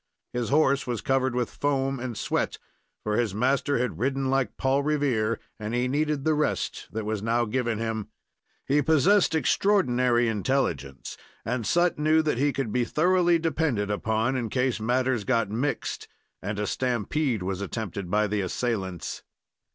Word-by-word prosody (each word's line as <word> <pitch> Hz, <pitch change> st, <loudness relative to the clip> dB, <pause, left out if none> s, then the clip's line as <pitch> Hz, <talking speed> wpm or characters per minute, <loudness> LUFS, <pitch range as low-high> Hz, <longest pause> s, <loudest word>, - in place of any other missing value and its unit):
His 120 Hz, -2 st, -2 dB
horse 140 Hz, -2 st, +3 dB
was 120 Hz, -3 st, -1 dB
covered 130 Hz, -2 st, +1 dB
with 125 Hz, -2 st, -1 dB
foam 135 Hz, -2 st, 0 dB
and 120 Hz, -3 st, -5 dB
sweat, -, -, -1 dB, 0.5 s
for 105 Hz, 0 st, 0 dB
his 110 Hz, -5 st, 0 dB
master 135 Hz, +5 st, +1 dB
had 125 Hz, +1 st, -2 dB
ridden 135 Hz, 0 st, 0 dB
like 135 Hz, -1 st, 0 dB
Paul 135 Hz, +1 st, +2 dB
Revere, 135 Hz, -7 st, 0 dB, 0.2 s
and 105 Hz, +2 st, -3 dB
he 125 Hz, +1 st, +1 dB
needed 150 Hz, +1 st, 0 dB
the 160 Hz, -, +3 dB
rest 150 Hz, 0 st, -1 dB
that 110 Hz, -1 st, -4 dB
was 110 Hz, -1 st, -2 dB
now 115 Hz, +2 st, +1 dB
given 115 Hz, 0 st, -1 dB
him. 110 Hz, -1 st, -3 dB, 0.6 s
He 145 Hz, +2 st, +3 dB
possessed 160 Hz, +5 st, +4 dB
extraordinary 125 Hz, -8 st, +2 dB
intelligence, 100 Hz, -, -1 dB, 0.3 s
and 120 Hz, -2 st, -2 dB
Sut 175 Hz, -2 st, +2 dB
knew 155 Hz, +1 st, +3 dB
that 150 Hz, -6 st, 0 dB
he 145 Hz, +1 st, +3 dB
could 135 Hz, -6 st, -3 dB
be 125 Hz, -, +2 dB
thoroughly 175 Hz, +5 st, +3 dB
depended 150 Hz, -10 st, 0 dB
upon 110 Hz, +5 st, 0 dB
in 120 Hz, -3 st, -2 dB
case 125 Hz, -1 st, 0 dB
matters 125 Hz, +1 st, +1 dB
got 115 Hz, -3 st, +1 dB
mixed, 130 Hz, +7 st, -2 dB, 0.3 s
and 100 Hz, 0 st, -3 dB
a 105 Hz, -, -1 dB
stampede 125 Hz, 0 st, -1 dB
was 95 Hz, +1 st, -3 dB
attempted 100 Hz, -2 st, -4 dB
by 105 Hz, +3 st, +2 dB
the 105 Hz, 0 st, -1 dB
assailants. 95 Hz, -2 st, -3 dB
125 Hz, 160 wpm, -26 LUFS, 110-140 Hz, 0.6 s, possessed